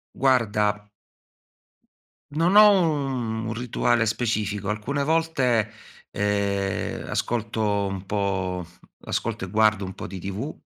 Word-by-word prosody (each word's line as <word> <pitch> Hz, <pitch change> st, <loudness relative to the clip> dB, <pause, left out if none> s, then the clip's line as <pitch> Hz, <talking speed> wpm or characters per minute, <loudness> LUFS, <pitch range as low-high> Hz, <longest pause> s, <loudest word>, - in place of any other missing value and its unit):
Guarda 105 Hz, -5 st, +1 dB, 1.5 s
non 170 Hz, +6 st, +2 dB
ho 210 Hz, 0 st, +10 dB, 0.2 s
un 125 Hz, -6 st, -2 dB
un 110 Hz, -, -3 dB
rituale 120 Hz, 0 st, +1 dB
specifico. 105 Hz, -3 st, -1 dB
Alcune 125 Hz, +7 st, -1 dB
volte, 135 Hz, -9 st, +1 dB, 0.4 s
ehm, 100 Hz, -1 st, -1 dB
ascolto 110 Hz, -3 st, -1 dB
un 95 Hz, -1 st, -5 dB
po' 95 Hz, -3 st, -2 dB, 0.4 s
ascolto -, -, -2 dB
e -, -, -7 dB
guardo 110 Hz, -1 st, +3 dB
un 95 Hz, 0 st, -6 dB
po' -, -, -7 dB
di 95 Hz, +1 st, -7 dB
tv, 100 Hz, -, -4 dB
110 Hz, 115 wpm, -24 LUFS, 100-125 Hz, 1.5 s, ho